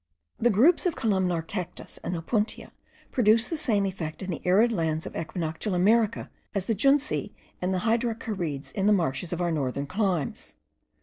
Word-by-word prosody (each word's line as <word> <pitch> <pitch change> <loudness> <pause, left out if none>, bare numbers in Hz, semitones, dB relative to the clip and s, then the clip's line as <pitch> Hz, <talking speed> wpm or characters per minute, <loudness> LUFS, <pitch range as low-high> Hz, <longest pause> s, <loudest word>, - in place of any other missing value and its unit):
The 240 - +4
groups 290 - +4
of 340 - -1
columnar 185 -6 +1
cactus 180 0 -6
and 180 - -2
opuntia 210 +6 -2 0.4
produce 225 -1 +4
the 330 - -1
same 230 -10 +1
effect 180 -3 -4
in 190 - -3
the 165 - -4
arid 205 +7 +4
lands 160 -5 -1
of - - -7
equinoctial 165 +4 -3
America 220 +4 +2 0.2
as 195 -2 0
the 225 - +1
junceae 275 +7 +2 0.3
and 180 +1 0
the 185 +2 -1
hydrocharides 215 - -1
in 195 +6 0
the 210 - +6
marshes 165 -3 0
of 175 0 -2
our 175 - +1
northern 140 -2 -1
climes. 185 -4 -2
190 Hz, 170 wpm, -27 LUFS, 165-225 Hz, 0.4 s, the